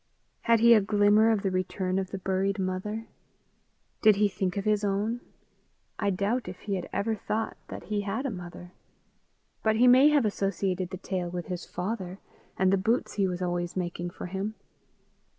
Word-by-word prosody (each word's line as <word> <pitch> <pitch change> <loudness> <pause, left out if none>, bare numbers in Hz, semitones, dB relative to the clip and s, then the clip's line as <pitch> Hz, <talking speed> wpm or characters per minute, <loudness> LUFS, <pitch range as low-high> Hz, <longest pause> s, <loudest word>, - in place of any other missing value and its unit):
Had 230 -1 +4
he 235 0 +8
a 215 - +6
glimmer 205 +2 +4
of 220 -2 +1
the 195 - 0
return 185 0 -1
of 190 -1 -3
the 195 - -5
buried 190 +2 0
mother? 195 +4 -3 1.0
Did 215 -2 +6
he 205 +1 +3
think 190 -1 -2
of 200 - -2
his 210 -1 +2
own? 205 +4 -1 0.8
I 200 - +1
doubt 200 +6 -1
if 180 0 -8
he 205 - -3
had 185 -2 -3
ever 225 +2 0
thought 220 +1 -3
that - - -8
he 210 -1 -2
had 210 +7 -3
a 270 - -1
mother; 175 -1 -9 0.9
but 220 0 +2
he 240 +3 +4
may 260 +4 +7
have 290 -5 +3
associated 195 -3 -1
the 185 - -6
tale 180 -2 -3
with 175 0 -5
his 180 -2 -5
father, 185 -1 -4 0.4
and 190 0 +3
the - - +4
boots 225 +6 0
he 200 -2 +1
was 180 0 -3
always 175 0 -2
making 175 -1 -3
for - - -8
him. 195 +4 -4
195 Hz, 185 wpm, -28 LUFS, 185-215 Hz, 1.0 s, he